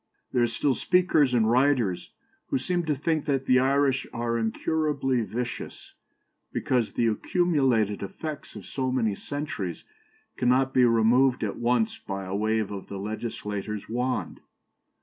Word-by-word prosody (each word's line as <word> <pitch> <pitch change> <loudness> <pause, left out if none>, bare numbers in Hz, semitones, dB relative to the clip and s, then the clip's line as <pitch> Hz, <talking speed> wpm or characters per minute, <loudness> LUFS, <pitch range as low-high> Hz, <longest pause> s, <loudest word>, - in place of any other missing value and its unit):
There 125 - +2
are 120 - +4
still 130 +4 0
speakers 175 -5 +3
and 115 -3 +3
writers 120 -6 +2 0.4
who - - 0
seem 175 +6 -1
to 150 -2 +1
think 155 +2 -1
that 135 -2 0
the 125 0 +5
Irish 135 0 +2
are 115 0 -2
incurably 135 +3 0
vicious, 120 +1 -5 0.6
because 125 -4 0
the 120 - +1
accumulated 125 - +1
effects 150 +9 -6
of - - -9
so 130 -2 -2
many 115 -5 +1
centuries 110 - -5 0.5
cannot 130 +2 +2
be 125 - +5
removed 120 +3 +3
at 105 - -2
once 220 - +1
by 95 - -5
a 95 - -5
wave 110 0 0
of 100 -2 -6
the 100 - -6
legislator's 105 0 -4
wand. 125 +3 -2
125 Hz, 145 wpm, -26 LUFS, 110-140 Hz, 0.6 s, the